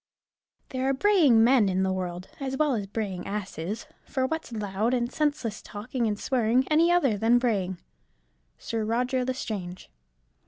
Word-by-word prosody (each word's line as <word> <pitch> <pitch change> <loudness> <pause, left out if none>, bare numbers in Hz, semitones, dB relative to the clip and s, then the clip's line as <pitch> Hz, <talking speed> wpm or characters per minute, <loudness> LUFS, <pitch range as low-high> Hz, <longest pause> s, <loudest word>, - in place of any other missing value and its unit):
There 260 +1 -1
are 270 - +2
braying 290 - +5
men 235 -4 +5
in 190 0 +1
the 190 0 +1
world, 180 -1 -4
as 265 -1 -3
well 300 -2 +2
as 205 -4 -2
braying 195 -3 -4
asses; 200 0 -4 0.2
for 260 -2 -1
what's 320 0 -3
loud 210 +2 -1
and 240 0 -1
senseless 290 -8 -1
talking 230 +3 -3
and 210 -1 -2
swearing 250 0 +1
any 330 +3 +5
other 275 - +2
than 230 +3 +4
braying? 200 -7 0 0.8
_Sir 225 -1 -3
Roger 250 +2 +1
L'Estrange. 210 -8 -5
230 Hz, 155 wpm, -27 LUFS, 205-260 Hz, 0.8 s, braying